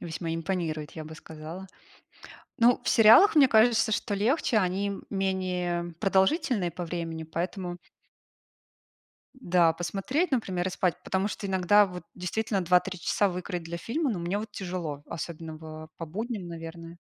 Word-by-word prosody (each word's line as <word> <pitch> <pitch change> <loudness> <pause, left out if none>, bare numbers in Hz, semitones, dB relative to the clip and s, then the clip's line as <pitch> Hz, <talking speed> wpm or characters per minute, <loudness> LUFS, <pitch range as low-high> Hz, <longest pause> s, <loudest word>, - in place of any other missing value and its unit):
весьма 165 0 -4
импонирует, 165 -3 -3
я 160 - -7
бы 155 +1 -9
сказала. 160 +4 -9 0.9
Ну, 240 +1 +5
в - - -3
сериалах, 230 - +7
мне 275 -3 +7
кажется, 220 -1 +4
что 205 0 -1
легче. 230 +3 +2
Они 195 +1 0 0.2
менее 180 -3 -1
продолжительные 195 - +2
по 175 +2 -5
времени, 165 -1 -4
поэтому 175 +2 -4 1.6
Да, 175 -6 +3
посмотреть, 195 - -1
например, 190 -8 -1
и - - -1
спать. 180 -2 0
Потому 190 +2 0
что 205 - -5
иногда 190 +2 +4
вот, 180 -1 -8
действительно, 195 +3 -2
2, 180 +1 +5
3 185 0 -7
часа 200 +4 +1
выкроить 180 -1 -4
для 170 +1 -5
фильма- 275 - -1
ну, 180 - -3
мне 175 +4 -2
вот 220 +1 -6
тяжело, 175 -7 -5
особенно 160 0 -6
в 155 0 -9
по 165 - -6
будням, 215 +3 -4
наверное. 165 0 -8
180 Hz, 150 wpm, -28 LUFS, 165-205 Hz, 1.6 s, сериалах